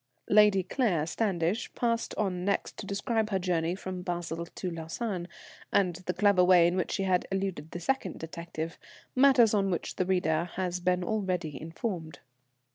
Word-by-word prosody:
[_Lady 205 -3 +5
Claire 180 - +1
Standish 185 +2 -1
passed 230 -1 0
on 185 -4 -1
next 200 +1 -1
to 200 - -7
describe 215 +2 0
her 195 - +1
journey 175 -2 0
from 185 -1 -6
Basle 170 -2 -3
to 180 +1 -5
Lausanne, 175 +3 -4 0.4
and 180 -4 +2
the 180 - +1
clever 200 -2 +4
way 180 -2 +6
in 175 +1 +2
which 185 - -1
she 195 - 0 0.3
eluded 190 -6 -2
the 175 - -6
second 190 -1 -1
detective 165 0 -6 0.4
matters 255 -4 +6
on 195 -2 +2
which 175 - -3
the 185 - +1
reader 170 -3 +1
has 180 -1 -1
been 180 0 +1
already 185 -7 -1
informed. 165 0 -5
185 Hz, 160 wpm, -29 LUFS, 170-200 Hz, 0.4 s, way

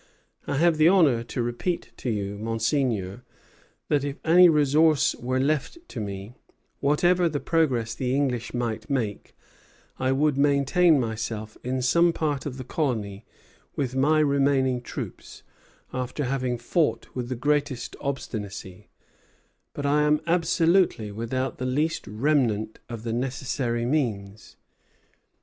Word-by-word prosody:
I 140 - -1
have 165 +1 +3
the 155 +1 +5
honor 160 -11 +4
to 120 +1 -3
repeat 120 +9 -3
to 125 - -4
you, 100 -2 -2
Monseigneur, 115 -2 -1 0.7
that 145 -2 +1
if 140 0 -4
any 175 +2 +7
resource 150 0 +3
were 130 +2 -2
left 150 - 0 0.2
me, 100 -1 -5 0.5
whatever 175 +5 +3
the 145 -2 -2
progress 130 -10 0
the 125 +1 -1
English 125 -4 -1
might 120 -1 -3
make, 115 -7 -3 0.6
I 130 0 +1
would 140 +1 +1
maintain 145 +3 +4
myself 110 -2 -4
in 130 +1 -2
some 170 +6 +4
part 145 -4 -2
of 130 -2 -6
the 130 - -6
colony 115 -8 -2 0.5
with 130 -2 -2
my 155 +4 +3
remaining 135 -3 +2
troops, - - -8 0.5
after 130 +3 -3
having 130 -2 -1
fought 150 +7 0
with 125 -1 -4
the 130 - -2
greatest 145 -1 -1
obstinacy; 105 -7 -5 0.8
but 145 - -5
I 145 +1 +3
am 150 0 +3
absolutely 170 - +2
without 115 +5 -3
the 130 - -2
least 150 +3 -1
remnant 110 -2 0
of 115 -2 -7
the 115 -1 -3
necessary 125 -1 -2
means. 110 -7 -2
130 Hz, 130 wpm, -25 LUFS, 115-150 Hz, 0.8 s, any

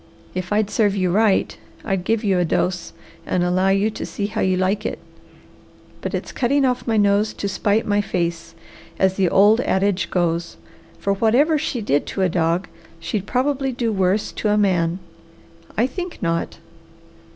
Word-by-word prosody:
If 185 0 -4
I'd 210 0 +1
serve 205 -1 +2
you 185 -2 +1
right, 210 0 +2 0.3
I'd 195 -4 -1
give 225 +1 0
you 195 -3 +2
a - - +3
dose 175 +1 -1 0.3
and 180 - 0
allow 185 +2 +2
you 195 +3 +2
to - - -6
see 200 - -4
how 205 - -3
you 185 -1 +2
like 190 +3 0
it. - - -3 1.0
But - - -3
it's - - -5
cutting 270 +2 +1
off 250 -1 -1
my 225 -1 +1
nose 205 +1 +2
to 200 - -3
spite 205 +2 0
my 205 0 +2
face, 170 -4 -3 0.4
as 190 -1 +3
the 190 -2 +1
old 210 +6 +5
adage 190 -2 0
goes, 170 -1 -1 0.4
for 200 - 0
whatever 255 +10 +3
she 275 -5 -2
did 145 -8 0
to 195 - -2
a 185 - +3
dog, 170 +1 0 0.3
she'd 200 +4 -3
probably 270 +1 0
do 235 -2 -1
worse 190 +1 +1
to 215 - -2
a 210 - +3
man. 180 -4 +2 0.8
I 230 - +3
think 355 +7 -5
not!" 165 -1 -2
200 Hz, 175 wpm, -21 LUFS, 185-220 Hz, 1.0 s, old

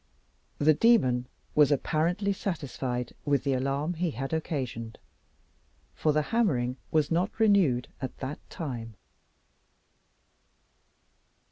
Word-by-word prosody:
The 155 +2 +5
demon 130 - +3 0.3
was 150 -1 +5
apparently 170 +8 +1
satisfied 130 - -3
with 145 -2 +1
the 140 -2 +1
alarm 140 +5 -1
he 175 +1 -1
had 135 +2 -4
occasioned, 130 -8 -3 1.0
for 155 - +1
the 150 0 +2
hammering 130 - +1
was 155 -1 +1
not 180 +7 0
renewed 190 - +4
at 130 - -5
that 135 +2 -5
time. 120 -8 -5
145 Hz, 105 wpm, -28 LUFS, 125-170 Hz, 1.0 s, The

